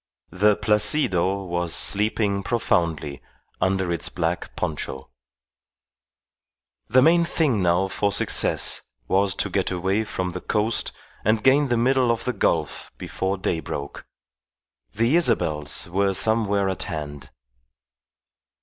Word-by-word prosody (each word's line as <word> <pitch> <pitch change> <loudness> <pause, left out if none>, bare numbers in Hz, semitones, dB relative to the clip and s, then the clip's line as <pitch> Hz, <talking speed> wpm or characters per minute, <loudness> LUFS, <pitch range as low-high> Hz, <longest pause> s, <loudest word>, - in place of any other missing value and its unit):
The 105 +2 +3
Placido 100 - +1
was 85 -2 -2
sleeping 105 -1 +2
profoundly 85 - -1 0.4
under 95 -1 0
its 85 - -1
black 85 0 -3
poncho. 65 -4 -5 1.8
The 130 +4 +5
main 170 +3 +4
thing 150 - 0
now 90 +2 +2
for 100 +1 -1
success - - +3 0.3
was 95 0 +1
to - - 0
get - - 0
away 95 +4 -1
from 95 -4 -4
the 90 +1 -7
coast 110 +2 -1 0.3
and 110 0 +1
gain 140 +2 +4
the 120 -2 0
middle 130 +1 +2
of 115 - -3
the 125 - -1
gulf 80 -9 -1
before 95 +1 -3
day 90 -3 -2
broke. 70 -3 -7 0.9
The 115 +7 +1
Isabels 80 - +1
were 95 +2 0
somewhere 100 -1 +1
at 95 -2 -3
hand. 75 -2 -7
100 Hz, 120 wpm, -23 LUFS, 85-110 Hz, 1.8 s, The